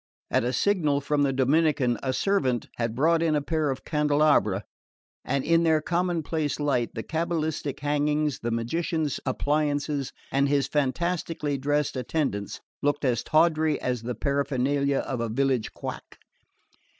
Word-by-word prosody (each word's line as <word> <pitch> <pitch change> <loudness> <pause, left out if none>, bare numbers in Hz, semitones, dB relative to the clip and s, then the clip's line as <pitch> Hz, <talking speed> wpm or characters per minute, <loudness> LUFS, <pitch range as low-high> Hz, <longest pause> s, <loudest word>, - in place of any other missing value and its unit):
At - - +2
a 125 - 0
signal 150 -1 +2
from 145 +1 0
the 140 -1 +3
Dominican 135 -2 +2
a 130 - -1
servant 130 - +1
had 115 -1 -2
brought 165 +5 +3
in 160 -2 +2
a - - +3
pair 155 -1 0
of 135 -1 -4
candelabra, 150 - +2 0.6
and 140 0 -1
in 165 +1 +4
their 160 -2 +3
commonplace 165 -3 -1
light 135 -6 0
the 110 - -4
cabalistic 160 -4 -2
hangings, 150 0 0
the 120 - -3
magician's 150 +6 -1
appliances 145 0 0 0.2
and 140 +1 +2
his 140 -1 +2
fantastically 150 +1 -1
dressed 145 +2 0
attendants 125 -6 -2 0.2
looked 145 0 0
as 125 -3 +1
tawdry 155 -1 +2
as 125 -2 -2
the 120 +1 -4
paraphernalia 140 +1 0
of 125 -3 -3
a 115 - -2
village 130 0 0
quack. - - -7
145 Hz, 145 wpm, -26 LUFS, 130-155 Hz, 0.6 s, in